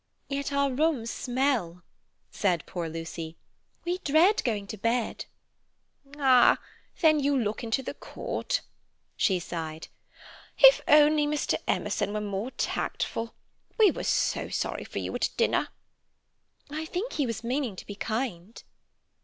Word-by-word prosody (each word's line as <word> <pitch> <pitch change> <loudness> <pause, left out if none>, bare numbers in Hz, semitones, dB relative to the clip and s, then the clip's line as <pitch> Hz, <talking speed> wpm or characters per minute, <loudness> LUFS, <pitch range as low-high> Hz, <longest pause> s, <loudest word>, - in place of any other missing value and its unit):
"Yet 280 0 -2
our 280 -1 +2
rooms 265 -4 0
smell," 245 -10 -1 0.5
said 180 -5 0
poor 170 -2 -4
Lucy. 165 0 -6 0.5
"We 355 +1 -1
dread 340 +6 +4
going 210 -5 -1
to 215 - -7
bed." 230 +2 -1 0.9
"Ah, 260 -4 +6 0.4
then 310 -3 +5
you 280 0 +2
look 215 0 -2
into 230 +4 -1
the - - -5
court." - - -3 0.5
She 190 - +2
sighed. 160 -2 -6 0.7
"If - - +8
only 300 0 +6
Mr. 300 0 0
Emerson 205 - 0
was 210 0 -2
more 205 +3 -3
tactful! 230 -3 -3 0.4
We 430 -5 +6
were - - -5
so - - 0
sorry - - -3
for - - -8
you - - -3
at - - 0
dinner." - - +2 1.0
"I 310 +2 -3
think 365 +9 -4
he 285 -4 0
was 230 -1 -4
meaning 250 -3 -1
to - - -9
be 205 - -7
kind." 220 -2 -4
245 Hz, 135 wpm, -28 LUFS, 200-295 Hz, 1.0 s, If